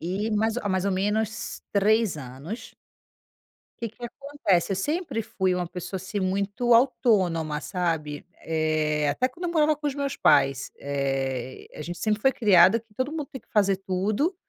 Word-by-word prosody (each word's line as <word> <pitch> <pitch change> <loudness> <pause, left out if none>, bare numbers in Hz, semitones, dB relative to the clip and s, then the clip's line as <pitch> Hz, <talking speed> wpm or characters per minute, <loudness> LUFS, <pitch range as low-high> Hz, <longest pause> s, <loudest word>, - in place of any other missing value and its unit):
E, 195 +6 -2
mais 220 +2 +1
há 230 -4 -2
mais 190 -1 0
ou 200 - +1
menos 210 +3 -1
3 215 -1 +3
anos 140 - -8 1.1
que 230 - -2
que 235 +3 -11
acontece, 260 - -1
eu - - -1
sempre 300 - -1
fui 190 -4 0
uma 180 -1 -1
pessoa, 180 +2 -6
assim, 190 +3 -4
muito 200 +5 0
autônoma, 195 - +3
sabe. 160 -5 -2 0.2
Eh, 155 -2 0
até 150 - +1
quando 335 +8 -9
eu - - -2
morava 310 -2 +3
com 300 0 -5
os 285 - -1
meus 280 -1 -2
pais, 135 -1 +3
eh, 135 -2 -2
a - - -6
gente 175 +3 -6
sempre 215 -1 0
foi 265 - +5
criada 200 -2 +6
que 225 -2 -20
todo 255 +5 -1
mundo 305 -2 -4
tem 265 - -7
que - - -37
fazer 200 -2 +3
tudo, 200 - 0
200 Hz, 175 wpm, -26 LUFS, 165-230 Hz, 1.1 s, criada